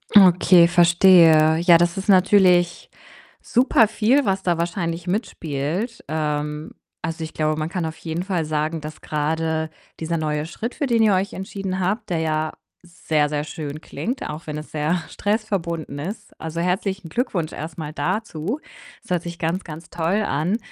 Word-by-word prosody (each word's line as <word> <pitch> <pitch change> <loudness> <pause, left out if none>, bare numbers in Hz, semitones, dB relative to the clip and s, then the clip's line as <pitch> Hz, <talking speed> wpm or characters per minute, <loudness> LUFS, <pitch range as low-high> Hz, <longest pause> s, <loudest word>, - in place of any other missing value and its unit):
Okay, 180 -2 +7
verstehe. 170 -2 +6
Ja, 170 0 +6
das 175 +2 +1
ist 195 - -4
natürlich 185 -2 +4 0.5
super 245 -2 +3
viel, 230 +6 +2
was 195 -1 0
da 175 -2 +1
wahrscheinlich 170 0 -2
mitspielt. 180 - -3
Ähm, 150 0 -3 0.3
also, 165 -1 -4
ich 160 - -7
glaube, 155 0 0
man 155 - -1
kann 180 -2 -2
auf 160 0 -5
jeden 165 +1 -4
Fall 180 -4 -1
sagen, 155 +1 -1
dass 155 0 -8
grade 160 +1 -1 0.3
dieser 165 +1 -2
neue 150 -1 -1
Schritt, 225 +8 -5
für 295 - -1
den 235 -4 +3
ihr 210 -2 +4
euch 190 +1 0
entschieden 190 -1 -4
habt, 210 +4 -1
der 170 -3 0
ja 155 -1 -1 0.3
sehr, 160 -4 0
sehr 145 0 -2
schön 150 -1 -6
klingt, 250 +9 -4
auch 150 +2 -7
wenn 150 -1 -4
es 150 - -9
sehr 155 +3 0
stressverbunden 185 -9 -2
ist. 200 +7 -6
Also, 160 +1 -4
herzlichen 190 0 -2
Glückwunsch 180 - -2
erst 155 +1 -7
mal 155 -2 -5
dazu. 180 - -3 0.4
Es - - -19
hört 175 -2 0
sich 170 0 -7
ganz, 170 +4 -2
ganz 160 0 -9
toll 170 +5 0
an. 170 +4 0
170 Hz, 170 wpm, -22 LUFS, 155-190 Hz, 0.5 s, Okay